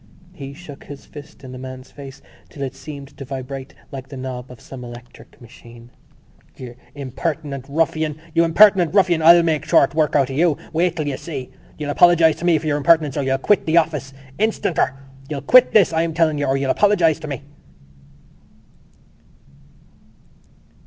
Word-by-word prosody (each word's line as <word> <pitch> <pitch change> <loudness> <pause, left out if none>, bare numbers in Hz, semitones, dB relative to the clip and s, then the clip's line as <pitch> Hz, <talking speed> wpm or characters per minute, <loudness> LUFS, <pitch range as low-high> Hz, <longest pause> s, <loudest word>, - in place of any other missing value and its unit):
He 140 -4 -9
shook 150 -4 -12
his 145 -1 -11
fist 145 -1 -13
in 130 - -10
the 130 - -9
man's 130 0 -10
face 140 -1 -12 0.3
till 140 - -7
it 135 -1 -4
seemed 140 0 -10
to - - -9
vibrate 135 0 -7 0.2
like 135 -1 -8
the 140 - -9
knob 130 -1 -7
of 125 -2 -13
some 130 -2 -11
electric 120 +3 -13
machine: 120 0 -15 0.7
"You 125 -2 -9 0.2
impertinent 140 0 -5
ruffian! 155 0 -1 0.2
You 165 0 +3
impertinent 180 +1 +4
ruffian! 180 -5 +3
I'll 170 +2 +7
make 155 -3 0
short 150 -3 +3
work 155 -1 0
of 140 -3 +3
you! 155 +2 +1 0.2
Wait 170 +1 +1
till 155 -3 -3
you 135 -2 -3
see! 140 -7 -7 0.3
You'll 150 -1 -4
apologise 165 -1 +4
to 175 - -6
me 170 -2 +4
for 155 - -7
your 150 -1 0
impertinence 150 -1 +3
or 145 - -1
you'll 135 0 0
quit 195 +8 +1
the 160 +2 +2
office 150 -5 0 0.3
instanter! 205 -10 0 0.3
You'll 145 -3 -4
quit 255 - +6
this, 200 -6 +4
I'm 165 0 -1
telling 160 -3 +1
you, 145 - -1
or 135 +1 +1
you'll 135 -1 0
apologise 180 -6 +2
to 155 - -8
me!" 140 -1 -6
145 Hz, 175 wpm, -20 LUFS, 135-165 Hz, 0.7 s, I'll